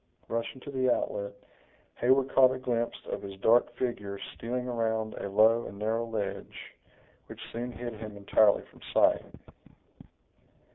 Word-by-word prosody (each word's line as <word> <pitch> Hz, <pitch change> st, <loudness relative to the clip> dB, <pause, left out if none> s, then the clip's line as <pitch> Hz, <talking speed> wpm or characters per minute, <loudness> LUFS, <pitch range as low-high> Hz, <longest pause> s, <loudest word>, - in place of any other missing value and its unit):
Rushing 115 Hz, +3 st, -3 dB
to 140 Hz, -, -8 dB
the 130 Hz, -2 st, +2 dB
outlet, 100 Hz, -3 st, -1 dB, 0.6 s
Heyward 130 Hz, +2 st, +3 dB
caught 130 Hz, -1 st, +7 dB
a -, -, -4 dB
glimpse 120 Hz, -2 st, -1 dB
of -, -, -3 dB
his 100 Hz, -1 st, -8 dB
dark 120 Hz, +2 st, +5 dB
figure 105 Hz, -6 st, -3 dB, 0.2 s
stealing 125 Hz, +2 st, -3 dB
around 110 Hz, -2 st, -1 dB
a -, -, -5 dB
low 110 Hz, +4 st, +4 dB
and 100 Hz, -, -9 dB
narrow 110 Hz, +3 st, -1 dB
ledge, 110 Hz, -3 st, -5 dB, 0.5 s
which -, -, -10 dB
soon 120 Hz, +2 st, -4 dB
hid 120 Hz, -1 st, -6 dB
him 105 Hz, -1 st, -8 dB
entirely 100 Hz, +1 st, +4 dB
from -, -, -20 dB
sight. -, -, +4 dB
115 Hz, 145 wpm, -29 LUFS, 105-125 Hz, 0.6 s, caught